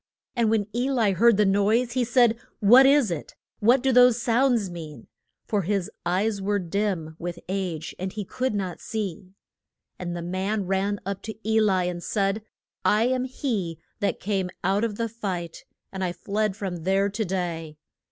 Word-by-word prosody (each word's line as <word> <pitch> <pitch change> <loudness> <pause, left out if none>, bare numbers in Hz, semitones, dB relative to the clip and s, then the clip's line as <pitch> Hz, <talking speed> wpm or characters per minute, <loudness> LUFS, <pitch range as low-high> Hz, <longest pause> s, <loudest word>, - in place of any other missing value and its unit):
And 235 -3 +2
when 215 -2 +2
E 250 +3 +1
li 230 -7 +2
heard 225 +3 +4
the 210 - +4
noise, 210 +5 +2
he 250 +1 +1
said, 240 -1 +3 0.2
What 245 +6 +7
is 275 -7 +4
it? 160 -4 -5 0.2
What 245 +4 +4
do 265 - +3
those 250 -1 +6
sounds 235 -2 +2
mean? 160 -8 -9 0.4
For 205 -2 0
his 195 0 -1 0.2
eyes 200 +3 0
were 205 +1 +1
dim 180 -3 -2
with 175 0 -4
age, 180 -4 -3
and 185 +1 -3
he 210 0 -5
could 255 +2 -2
not 185 -4 -3
see. 200 -5 -4 0.7
And 175 -1 -4
the 170 - -5
man 190 +4 -2
ran 195 +2 0
up 200 0 -4
to 220 - -6
E 220 0 +3
li 190 -4 +2
and 175 -1 -4
said, 195 +2 0 0.4
I 215 +2 +3
am 255 0 0
he 220 - -3 0.2
that 205 - -1
came 190 -2 -1
out 195 +3 +2
of 225 -3 -1
the 230 +2 -1
fight, 190 -7 -5 0.3
and 190 -1 -4
I 175 -1 -1
fled 210 +1 -1
from 195 -3 -4
there 190 +4 +1
to 205 +3 -2
day. 170 -5 -3
200 Hz, 180 wpm, -25 LUFS, 180-225 Hz, 0.7 s, What